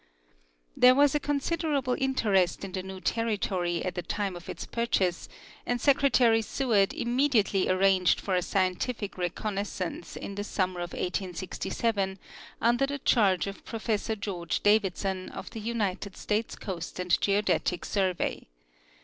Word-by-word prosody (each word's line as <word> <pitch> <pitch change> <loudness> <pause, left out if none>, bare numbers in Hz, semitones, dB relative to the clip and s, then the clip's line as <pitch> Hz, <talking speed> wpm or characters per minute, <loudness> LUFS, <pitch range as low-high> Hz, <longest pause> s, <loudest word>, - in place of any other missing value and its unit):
There 250 0 +7
was 285 0 +5
a 295 - +2
considerable 290 -2 0
interest 205 -9 +1
in 195 - -7
the 185 0 -3
new 190 0 -8
territory 190 -5 -1
at 185 - -2
the 180 - -3
time 200 0 -3
of 175 - -10
its - - -5
purchase, 195 -7 0 0.3
and 245 0 -1
Secretary 255 -4 +4
Seward 215 -4 +1
immediately 240 -6 +2
arranged 185 -1 +3
for 195 - -3
a 180 - +3
scientific 195 +4 -1
reconnaissance 185 -1 -3
in 200 - -6
the 205 +1 -4
summer 185 -3 -1
of 175 0 -5
1867 190 +2 -2 0.4
under 240 +4 +3
the 285 +1 -3
charge 195 - +3
of 195 0 -7
Professor 220 -1 -2
George 180 -5 -3
Davidson, 195 -2 +1
of - - -8
the 225 - -6
United 205 -4 -2
States 215 +2 -1
Coast 180 -3 -6
and 180 -1 +2
Geodetic 200 -3 +1
Survey. 190 -3 -1
200 Hz, 140 wpm, -28 LUFS, 185-235 Hz, 0.4 s, There